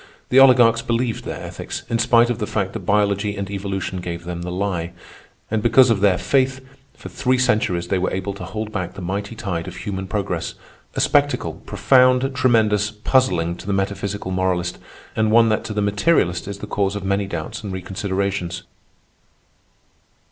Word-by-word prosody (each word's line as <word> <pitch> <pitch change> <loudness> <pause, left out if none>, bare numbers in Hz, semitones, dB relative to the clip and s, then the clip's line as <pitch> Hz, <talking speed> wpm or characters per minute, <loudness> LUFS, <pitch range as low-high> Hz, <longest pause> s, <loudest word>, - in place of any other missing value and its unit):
The 130 - +6
oligarchs 120 -3 +6
believed 115 0 -1
their - - -5
ethics, - - -6
in 115 - -1
spite 120 +1 +4
of 115 - -3
the 105 - -2
fact 95 -2 -2
that - - -4
biology 100 0 +1
and 100 0 -3
evolution 95 -2 -3
gave 85 -1 -5
them 85 0 -5
the 90 - -5
lie; 90 -2 -2 0.6
and, 110 -1 +1
because 120 +2 +5
of 110 - +2
their 95 -2 +3
faith, 130 +2 +1 0.4
for - - -10
three 130 0 0
centuries 105 -8 +1
they 95 - +1
were 95 - 0
able 95 +1 -3
to 95 -1 -9
hold 110 +3 -5
back 90 -3 -4
the 100 - -7
mighty 100 +5 -4
tide 90 -6 -4
of - - -7
human 95 +1 -5
progress—a 95 -4 -5
spectacle, 145 - +2
profound, 130 +5 +3
tremendous, 110 -5 +3
puzzling 105 -6 +1
to - - -11
the 100 - 0
metaphysical 100 0 -2
moralist, 90 -1 -1 0.4
and 110 0 +2
one 115 +1 +5
that 110 - 0
to - - -5
the 105 -1 0
materialist 100 - +1
is 100 0 -5
the - - -7
cause 100 -1 -1
of 100 - -4
many 100 +1 0
doubts 85 +2 -5
and 100 - -5
reconsiderations. 95 -1 -3
100 Hz, 175 wpm, -21 LUFS, 95-115 Hz, 0.6 s, The